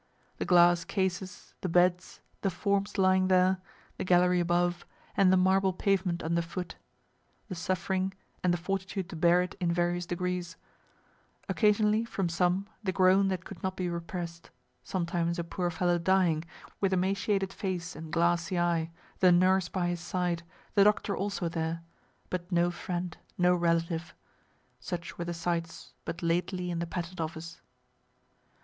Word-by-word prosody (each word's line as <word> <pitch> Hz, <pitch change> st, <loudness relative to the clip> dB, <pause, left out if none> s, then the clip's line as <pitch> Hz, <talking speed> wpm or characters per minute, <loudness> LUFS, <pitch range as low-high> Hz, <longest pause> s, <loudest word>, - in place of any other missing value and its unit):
The -, -, -1 dB
glass 175 Hz, -1 st, +5 dB
cases, 190 Hz, 0 st, -3 dB
the 185 Hz, -, -2 dB
beds, 180 Hz, +1 st, +2 dB, 0.2 s
the 195 Hz, -, +1 dB
forms 200 Hz, +3 st, -1 dB
lying 185 Hz, -1 st, +4 dB
there, 185 Hz, 0 st, +3 dB, 0.4 s
the -, -, -1 dB
gallery 180 Hz, 0 st, +4 dB
above, 175 Hz, 0 st, +1 dB, 0.3 s
and 195 Hz, -2 st, +5 dB
the 190 Hz, -, +5 dB
marble 190 Hz, +1 st, +3 dB
pavement 185 Hz, -2 st, 0 dB
under 170 Hz, +1 st, +1 dB
foot 170 Hz, +1 st, -6 dB, 0.7 s
the -, -, -3 dB
suffering, 185 Hz, +2 st, -1 dB, 0.3 s
and 180 Hz, -, +3 dB
the 175 Hz, -, +1 dB
fortitude 190 Hz, +1 st, -3 dB
to -, -, -7 dB
bear 175 Hz, +2 st, +4 dB
it 180 Hz, -, -6 dB
in 175 Hz, -2 st, +1 dB
various 175 Hz, 0 st, 0 dB
degrees 180 Hz, -1 st, -3 dB, 0.9 s
occasionally, 210 Hz, 0 st, +3 dB
from 195 Hz, -6 st, -2 dB
some, 180 Hz, +3 st, +1 dB, 0.2 s
the 190 Hz, -, 0 dB
groan 190 Hz, +2 st, +4 dB
that 185 Hz, -2 st, -2 dB
could 195 Hz, -, -10 dB
not 190 Hz, 0 st, -3 dB
be 180 Hz, -1 st, -1 dB
repress'd 170 Hz, -1 st, -6 dB, 0.3 s
sometimes 170 Hz, -2 st, -1 dB
a 170 Hz, -, -1 dB
poor 175 Hz, +1 st, -2 dB
fellow 175 Hz, +1 st, +1 dB
dying, 170 Hz, -3 st, +2 dB, 0.3 s
with 195 Hz, -1 st, +1 dB
emaciated 195 Hz, +1 st, 0 dB
face 180 Hz, -3 st, -4 dB
and 155 Hz, 0 st, -8 dB
glassy 170 Hz, +1 st, +1 dB
eye, 170 Hz, -2 st, +1 dB, 0.3 s
the 185 Hz, -1 st, +6 dB
nurse 185 Hz, +1 st, +4 dB
by 185 Hz, -2 st, -1 dB
his 175 Hz, -1 st, -2 dB
side, 175 Hz, -1 st, -1 dB, 0.3 s
the 200 Hz, -, +6 dB
doctor 205 Hz, 0 st, +2 dB
also 195 Hz, -3 st, -2 dB
there, 165 Hz, 0 st, -3 dB, 0.5 s
but 180 Hz, 0 st, -4 dB
no 175 Hz, 0 st, +3 dB
friend, 175 Hz, -1 st, -4 dB, 0.2 s
no 180 Hz, 0 st, +4 dB
relative 170 Hz, -1 st, 0 dB, 0.6 s
such 170 Hz, +7 st, -6 dB
were 170 Hz, -, -2 dB
the 175 Hz, -, -3 dB
sights 165 Hz, 0 st, -3 dB
but 170 Hz, +1 st, -5 dB
lately 180 Hz, +2 st, 0 dB
in 170 Hz, -, -2 dB
the 170 Hz, -, -2 dB
Patent 175 Hz, 0 st, -4 dB
office. 160 Hz, +1 st, -6 dB
180 Hz, 155 wpm, -30 LUFS, 170-185 Hz, 0.9 s, the